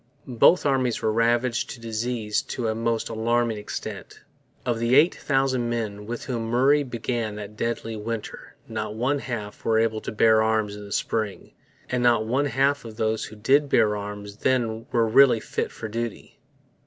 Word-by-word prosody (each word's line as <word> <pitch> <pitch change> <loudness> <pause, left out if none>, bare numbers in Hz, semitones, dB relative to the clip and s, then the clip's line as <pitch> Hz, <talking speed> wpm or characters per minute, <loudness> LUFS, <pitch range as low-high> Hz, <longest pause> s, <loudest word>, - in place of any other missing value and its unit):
Both 130 +8 +4
armies 130 -4 +1
were 110 - +2
ravaged 120 +2 +1
by - - -17
disease 115 -1 -1 0.2
to 120 -3 -1
a - - 0
most 115 0 -1
alarming 115 0 0
extent. 105 - -7 0.4
Of 120 -2 0
the 115 +2 +2
eight 155 +5 +6
thousand 135 -3 0
men 105 -3 -3
with 120 +1 -5
whom 115 -3 -3
Murray 135 +5 +4
began 120 -4 -3
that 105 0 -8
deadly 115 0 -3
winter 110 +1 -6
not 110 -1 -4
one 135 +5 0
half 110 -6 -6
were 110 -1 +2
able 110 -1 +1
to - - -5
bear 110 0 +4
arms 110 -2 +1
in 105 - -9
the 100 - -11
spring; 110 -1 -2 0.4
and 125 -1 -1
not 120 -3 +3
one 130 +6 +1
half 135 +2 +1
of 110 -2 -10
those 110 -1 0
who 110 - -10
did 140 +7 +2
bear 110 -4 +3
arms 105 0 -7
then 115 -2 0
were 115 -1 +2
really 125 +1 +6
fit - - -3
for 110 - -6
duty. 115 0 -5
115 Hz, 180 wpm, -25 LUFS, 110-125 Hz, 0.4 s, eight